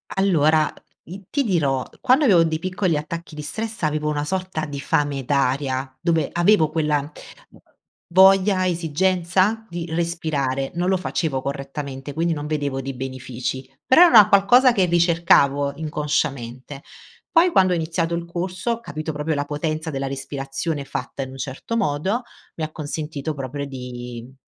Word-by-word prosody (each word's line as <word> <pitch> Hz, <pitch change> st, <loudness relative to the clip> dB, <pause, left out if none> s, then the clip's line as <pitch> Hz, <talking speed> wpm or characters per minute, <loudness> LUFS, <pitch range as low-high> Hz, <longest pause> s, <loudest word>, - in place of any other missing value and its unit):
Allora, 160 Hz, -5 st, +3 dB, 0.3 s
i 190 Hz, +4 st, -10 dB
ti 285 Hz, -1 st, 0 dB
dirò, 140 Hz, -, 0 dB
quando 265 Hz, +3 st, +4 dB
avevo 175 Hz, -7 st, +6 dB
dei 160 Hz, -1 st, -1 dB
piccoli 185 Hz, -3 st, 0 dB
attacchi 165 Hz, +2 st, -6 dB
di 150 Hz, -, -6 dB
stress 220 Hz, +6 st, -5 dB
avevo 150 Hz, 0 st, 0 dB
una 145 Hz, 0 st, -1 dB
sorta 185 Hz, -3 st, -3 dB
di 145 Hz, -1 st, -6 dB
fame 145 Hz, -2 st, 0 dB
d'aria, 130 Hz, -1 st, -1 dB
dove 165 Hz, -3 st, +1 dB
avevo 175 Hz, -3 st, +4 dB
quella 150 Hz, -2 st, 0 dB, 1.0 s
voglia, 190 Hz, 0 st, +5 dB
esigenza, 185 Hz, +5 st, +1 dB
di 170 Hz, -1 st, -5 dB
respirare 155 Hz, -5 st, -2 dB
non 180 Hz, +2 st, 0 dB
lo 190 Hz, -, +3 dB
facevo 155 Hz, -6 st, -2 dB
correttamente 140 Hz, 0 st, -5 dB
quindi 165 Hz, +1 st, 0 dB
non 145 Hz, -1 st, -5 dB
vedevo 145 Hz, -3 st, -2 dB
dei 135 Hz, +1 st, -5 dB
benefici 130 Hz, 0 st, -5 dB, 0.2 s
però 290 Hz, +7 st, +6 dB
era 355 Hz, -, +9 dB
una 215 Hz, -3 st, +8 dB
qualcosa 240 Hz, +6 st, +6 dB
che 195 Hz, -, +2 dB
ricercavo 165 Hz, -5 st, +3 dB
inconsciamente, 145 Hz, -4 st, -3 dB, 0.5 s
poi 345 Hz, +1 st, +5 dB
quando 185 Hz, -1 st, +4 dB
ho -, -, +2 dB
iniziato 165 Hz, +1 st, -1 dB
il 170 Hz, 0 st, -4 dB
corso 180 Hz, +6 st, -3 dB
ho 230 Hz, -, -2 dB
capito 155 Hz, -5 st, -5 dB
proprio 150 Hz, +2 st, -2 dB
la 145 Hz, 0 st, -1 dB
potenza 155 Hz, +2 st, -3 dB
della 135 Hz, -1 st, -3 dB
respirazione 140 Hz, +2 st, -4 dB
fatta 135 Hz, +1 st, -5 dB
in 130 Hz, -, -8 dB
un 135 Hz, -, -10 dB
certo 135 Hz, -, -4 dB
modo, 195 Hz, -, 0 dB, 0.3 s
mi 160 Hz, -, -4 dB
ha 155 Hz, -, -9 dB
consentito 155 Hz, 0 st, -4 dB
proprio 140 Hz, +1 st, -5 dB
di 125 Hz, -3 st, -7 dB
mhmm 130 Hz, -, -19 dB
155 Hz, 155 wpm, -22 LUFS, 140-180 Hz, 1.0 s, era